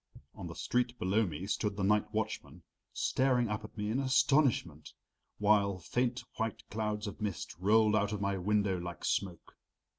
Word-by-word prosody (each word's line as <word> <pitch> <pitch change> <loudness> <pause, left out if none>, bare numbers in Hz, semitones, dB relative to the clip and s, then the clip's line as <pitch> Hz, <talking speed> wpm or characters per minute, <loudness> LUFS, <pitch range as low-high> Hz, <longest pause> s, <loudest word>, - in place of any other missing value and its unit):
On - - -7
the - - -8
street 125 0 -1
below 100 +3 +1
me 85 +3 -5
stood 105 0 -1
the 100 - -1
night 105 +1 +2
watchman, 110 0 -4 0.3
staring 125 -3 +1
up 105 0 -3
at 110 - -11
me 105 0 -2
in 125 - 0
astonishment, 130 - +2 0.4
while 100 -2 +3
faint 120 +7 -1
white 115 -2 -3
clouds 105 0 -2
of 105 +2 -7
mist 105 -4 -4
rolled 105 +2 +4
out 105 -1 +1
of 105 - -2
my 100 0 0
window 100 -1 +1
like 85 -2 -6
smoke. 90 -4 -2
105 Hz, 170 wpm, -32 LUFS, 100-115 Hz, 0.4 s, rolled